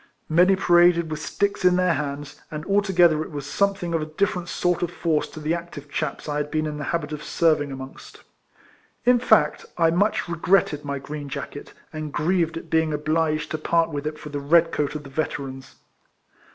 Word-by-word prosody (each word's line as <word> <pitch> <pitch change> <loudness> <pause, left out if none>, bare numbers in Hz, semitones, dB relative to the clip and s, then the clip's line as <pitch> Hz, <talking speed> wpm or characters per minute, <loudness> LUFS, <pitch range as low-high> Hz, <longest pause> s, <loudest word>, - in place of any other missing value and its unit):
Many 180 +4 +5
paraded 175 -3 +4
with 155 0 -4
sticks 200 +4 -1
in 180 -1 +5
their 180 -1 +3
hands, 145 -1 -5
and 150 -1 -6
altogether 185 -6 +3
it - - -5
was 145 -3 -6
something 195 0 0
of 165 - +1
a 155 - -4
different 180 +2 -1
sort 175 +1 0
of 175 - 0
force 165 -3 0
to - - -10
the 155 +2 -1
active 170 -4 -7
chaps 155 0 -3
I 145 -1 -2
had 150 0 -2
been 155 0 -1
in 150 -1 -4
the 145 - -4
habit 160 -3 -2
of 150 0 -5
servin"" 155 -4 +2
araono 135 0 -8
st. - - -14 0.8
In 250 0 +5
fact, 250 - +3
I 165 -1 +4
much 205 +6 +2
re2:retted 170 -2 +1
my 140 -1 -3
green 145 +1 -7
jacket, 140 0 -7 0.2
and 155 -1 -5
grieved 165 +1 0
at 165 -1 -9
being 160 -1 +2
obliged 155 +1 0
to 155 - -2
part 165 +1 +1
with 145 0 -3
it 155 0 -4
for 150 - -9
the 145 -1 -4
red 165 +4 +4
coat 150 -1 -1
of 150 - -5
the 135 - -12
Veterans. 135 -3 -4
155 Hz, 205 wpm, -24 LUFS, 150-175 Hz, 0.8 s, Many